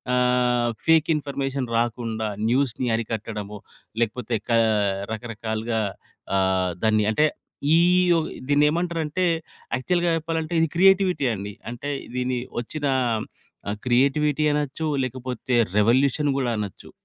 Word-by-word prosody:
ఆహ్, 125 -1 +2 0.2
fake 160 -1 +4
information 135 -3 -3
రాకుండా, 115 -2 -2 0.2
న్యూస్‌ని 130 -1 +1
అరికట్టడము. 105 -2 -5 0.4
లేకపోతే 115 +1 -1
క - - 0 0.6
రకరకాలుగా 110 0 -3 0.6
ఆహ్, 95 -1 +1
దాన్ని 110 -1 +3
అంటే 150 +7 +3 0.5
ఈ - - +6 0.4
ఓహ్! 160 - -1 0.2
దీన్ని 145 +1 +4
ఏమంటారంటే, 170 +1 -1 0.5
యాక్చువల్‌గా 175 +6 +1
చెప్పాలంటే, 160 0 -3
ఇది 165 - +3
క్రియేటివిటీ 190 -3 +4
అండి. 100 0 -6 0.2
అంటే 125 +4 -5 0.3
దీని 125 0 -1 0.2
వచ్చిన 145 +5 -5 0.9
ఆహ్, 105 - -4
క్రియేటివిటీ 140 +4 +2
అనొచ్చు 150 +2 -2 0.2
లేకపోతే, 125 -1 -3 0.2
రివల్యూషన్ 130 +7 +3
కూడా 125 -3 0
అనొచ్చు 100 -3 -7
125 Hz, 110 wpm, -24 LUFS, 115-150 Hz, 0.9 s, ఈ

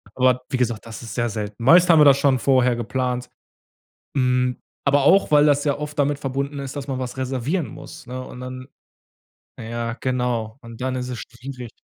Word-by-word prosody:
Aber 125 0 +3
wie 130 - -1
gesagt, 120 -2 -1
das 115 +1 -8
ist 115 - -7
sehr 120 -1 0
selten. 105 0 -5
Meist 175 +6 +6
haben 160 - +6
wir 150 - +7
das 140 -1 +7
schon 140 -2 +2
vorher 125 -2 +3
geplant. 125 +1 -2 0.9
Hm, 125 -1 +2 0.3
aber 140 0 +4
auch, 190 +2 +4
weil 150 0 +6
das 145 0 +3
ja 145 - +1
oft 150 0 -6
damit 145 0 +1
verbunden 140 +1 -3
ist, 135 +1 -6
dass 140 -1 -5
man 135 -2 -3
was 125 0 -5
reservieren 130 +6 -1
muss, 160 -4 -11
ne? 130 +1 -6
Und 125 - -10
dann 130 +1 -7 0.9
ja, 115 0 -4
genau. 125 -3 -1
Und 115 -1 -11
dann 130 0 -1
ist 125 0 -4
es 125 - -5
schwierig. 125 -1 -9
130 Hz, 195 wpm, -22 LUFS, 125-140 Hz, 0.9 s, wir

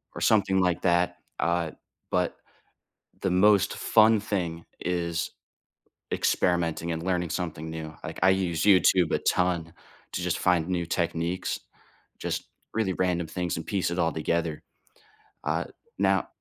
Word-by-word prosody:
or - - -6
something 95 -3 +3
like 90 -2 +1
that. 90 -1 +2 0.2
Uh, 85 -2 +1 0.4
but - - 0 0.8
the 95 - +1
most 95 +1 +4
fun 110 0 +5
thing 90 -6 -3
is 85 -2 -1 0.8
experimenting 85 -1 +1
and 80 0 -3
learning 90 -2 0
something 80 -3 -3
new. 80 -1 -6
Like, - - -6
I 95 - +6
use 90 -4 +1
YouTube 90 -3 +5
a - - +2
ton 85 -2 0 0.4
to - - -2
just 90 0 -1
find 90 -3 +2
new 90 -2 -1
techniques, 85 +1 -1 0.6
just - - -3 0.3
really 110 -4 +1
random 90 -2 0
things, 90 +1 -2
and 80 - -6
piece 95 -4 0
it 85 - -3
all 80 -1 +2
together. 80 0 -1 0.8
Uh, - - 0 0.3
now - - +2
90 Hz, 140 wpm, -27 LUFS, 85-95 Hz, 0.8 s, I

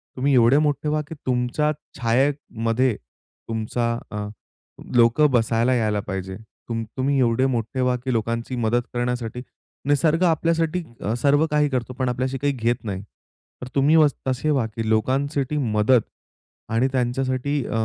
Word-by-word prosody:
तुम्ही 135 +2 +1
एवढे 125 +3 +5
मोठे 150 0 +1
व्हा 155 0 +1
की 160 - -8
तुमच्या 125 +4 +1 0.3
छायेमध्ये 125 -2 +1
तुमचा 115 - -5 0.2
अ, 105 0 -4 0.7
लोकं 120 +6 +5
बसायला 115 +1 +2
यायला 110 -3 +1
पाहिजे. 95 -1 -5
तू 110 +1 -11 0.2
तुम्ही 135 +1 +1
एवढे 120 +1 +2
मोठे 125 0 -1
व्हा, 125 0 +2
की 130 +1 -3
लोकांची 115 +2 -2
मदत 120 +1 +1
करण्यासाठी 120 -1 -2 0.4
निसर्ग 155 +4 +2
आपल्यासाठी 165 +1 +1 0.2
अ, 105 - -1
सर्व 145 +2 +4
काही 150 -1 +3
करतो 125 -1 -2
पण 130 -1 +1
आपल्याशी 130 +2 -2
काही 145 +2 0
घेत 120 -2 -1
नाही. 95 -3 -4 0.6
तर 125 - -6
तुम्ही 145 +3 +4
व 155 -2 +7 0.2
तसे 130 +4 0
व्हा 135 -5 +1
की 115 -1 -2
लोकांसाठी 135 +5 0
मदत 115 -1 +3 0.7
आणि 115 +4 +2
त्यांच्यासाठी 130 +2 -1
अ, - - -6
125 Hz, 150 wpm, -23 LUFS, 115-140 Hz, 0.7 s, व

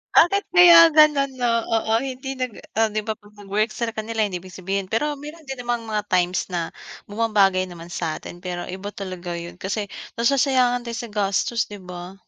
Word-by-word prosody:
Bakit 395 +4 +5
kaya 350 -2 +9 0.2
gano'n 290 -3 +5
'no, 240 - +2 0.3
oo, 220 0 0
hindi 265 +1 -5
nag 255 -1 -2 0.3
ah, 225 0 +4
'di 215 - 0
ba 220 - 0
'pag 210 -1 -20
nag-work 210 +2 0
sa 235 -1 -2
kanila 220 0 -3
hindi 195 -4 0
big 185 - -12
sabihin, 195 +1 -2
pero 295 +6 0
meron 300 +1 -11
din 265 - -4
namang 240 -1 -2
mga 210 -1 -1
times 180 0 +2
na 175 - 0 0.5
bumabagay 205 -4 +2
naman 175 -2 -11
satin 170 0 -5
pero 175 -1 -5
iba 190 +2 -6
talaga 185 -3 -6
yun 170 +1 -7
kasi 200 +2 -3 0.3
nasasayangan 250 -1 +2
din 235 - -5
sa 235 - -8
gastos, 205 +3 0
'di 205 -1 -10
ba? 180 +1 -7
215 Hz, 185 wpm, -23 LUFS, 185-245 Hz, 0.5 s, kaya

